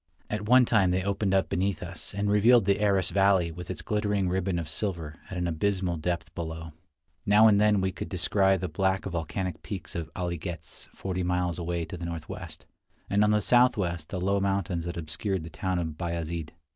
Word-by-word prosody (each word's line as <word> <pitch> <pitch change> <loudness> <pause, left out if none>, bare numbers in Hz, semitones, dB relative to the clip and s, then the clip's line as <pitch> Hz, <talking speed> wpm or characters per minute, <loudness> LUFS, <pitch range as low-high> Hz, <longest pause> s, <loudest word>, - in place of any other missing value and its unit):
At 105 0 -3
one 125 0 +7
time 105 -6 +3
they 90 +1 +1
opened 100 0 0
up 95 -4 +2
beneath 95 -1 -1
us, - - -7
and 100 0 0
revealed 105 +2 +5
the 100 +1 +2
Aras 95 -3 +2
valley 95 -4 +3
with 90 +2 -9
its 95 - -5
glittering 105 -3 0
ribbon 95 0 0
of 85 -3 -3
silver 80 -1 -3
at 95 - -5
an 90 - -1
abysmal 90 +1 0
depth 85 +2 -3
below. 80 -1 -5 0.5
Now 105 +2 +6
and 105 -1 +5
then 105 -2 +4
we 95 0 0
could - - -6
descry 95 +1 +2
the 90 0 -3
black 95 +4 0
volcanic 90 +1 -3
peaks 95 -4 -7
of 80 -2 -4
Ali 85 -3 -2
Ghez 85 +1 -7
forty 95 -1 -4
miles 90 -1 0
away 85 -1 -2
to 90 - -7
the 85 - -6
northwest, 85 -2 -7 0.5
and 100 +1 +4
on 105 - +4
the 105 0 +3
southwest 100 -11 +2
the 95 - -3
low 100 +2 +1
mountains 95 -4 -1
that 85 0 -4
obscured 85 +3 -2
the 80 - -8
town 95 +4 -2
of 80 -3 -3
Bayazid. 85 -2 -3
95 Hz, 200 wpm, -28 LUFS, 85-100 Hz, 0.5 s, one